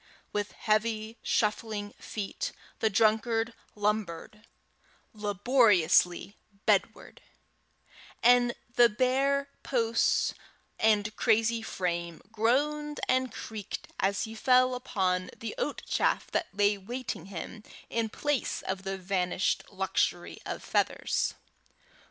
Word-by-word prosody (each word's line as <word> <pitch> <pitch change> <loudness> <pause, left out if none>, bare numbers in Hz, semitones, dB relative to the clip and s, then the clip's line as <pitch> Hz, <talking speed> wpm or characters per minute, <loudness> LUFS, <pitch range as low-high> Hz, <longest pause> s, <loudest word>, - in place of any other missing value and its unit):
With 205 0 -2
heavy 220 +1 0
shuffling 210 -1 -1
feet 220 - -4 0.3
the 220 - +3
drunkard 225 +2 +2 0.2
lumbered 210 0 -2 0.7
laboriously 205 -4 +3 0.3
bedward; - - 0 1.0
and 245 0 +5 0.2
the 240 -1 +8
bare 270 +5 +1
posts 230 -3 +2 0.5
and 210 -1 +2
crazy 225 0 +2
frame 170 -5 -3
groaned 295 +7 +1
and 255 0 +2
creaked 215 -2 -6
as 195 0 +1
he 220 - -5
fell 255 +2 +4
upon 185 -7 -1
the 230 - -5
oat - - -2
chaff - - 0
that - - 0
lay 205 0 +2
waiting 230 -3 -5
him 195 +3 -7 0.3
in 230 -1 -1
place 290 +3 -1
of 190 0 -3
the 195 0 -3
vanished 185 -1 0
luxury - - -1
of - - -5
feathers. - - 0
220 Hz, 105 wpm, -29 LUFS, 200-240 Hz, 1.0 s, the